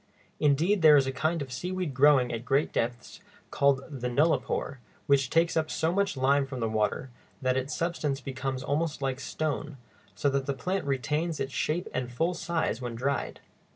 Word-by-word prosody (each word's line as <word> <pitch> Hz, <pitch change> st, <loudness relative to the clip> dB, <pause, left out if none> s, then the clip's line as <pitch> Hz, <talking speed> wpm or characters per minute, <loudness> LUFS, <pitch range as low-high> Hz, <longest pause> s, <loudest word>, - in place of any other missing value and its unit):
Indeed, 160 Hz, +7 st, +3 dB
there 155 Hz, -2 st, +8 dB
is 135 Hz, -, +3 dB
a 135 Hz, -, -1 dB
kind 155 Hz, +4 st, -1 dB
of 130 Hz, -, -11 dB
seaweed 180 Hz, +2 st, -3 dB
growing 135 Hz, -2 st, +4 dB
at 115 Hz, 0 st, -4 dB
great 135 Hz, +4 st, +1 dB
depths 120 Hz, +1 st, -3 dB, 0.3 s
called 140 Hz, -1 st, +2 dB
the 130 Hz, -5 st, -4 dB
nullipore, 140 Hz, 0 st, 0 dB, 0.3 s
which 140 Hz, -3 st, +3 dB
takes 165 Hz, +1 st, +2 dB
up 160 Hz, -1 st, +1 dB
so 160 Hz, +2 st, 0 dB
much 200 Hz, -5 st, 0 dB
lime 135 Hz, +1 st, +3 dB
from 130 Hz, -2 st, -6 dB
the 115 Hz, -, 0 dB
water 110 Hz, +3 st, -1 dB, 0.3 s
that 130 Hz, -1 st, +1 dB
its 130 Hz, +3 st, -2 dB
substance 155 Hz, -5 st, -1 dB
becomes 130 Hz, 0 st, -4 dB
almost 150 Hz, 0 st, -1 dB
like 135 Hz, -1 st, -1 dB
stone, 150 Hz, 0 st, -3 dB, 0.4 s
so 140 Hz, -, 0 dB
that 135 Hz, -1 st, -1 dB
the 140 Hz, -, -1 dB
plant 185 Hz, +7 st, -2 dB
retains 150 Hz, +5 st, -1 dB
its 135 Hz, 0 st, -3 dB
shape 170 Hz, +4 st, -1 dB
and 125 Hz, -1 st, -2 dB
full 165 Hz, +8 st, 0 dB
size 165 Hz, -7 st, -2 dB
when 120 Hz, -2 st, -4 dB
dried. 135 Hz, +4 st, -2 dB
140 Hz, 185 wpm, -28 LUFS, 130-160 Hz, 0.4 s, there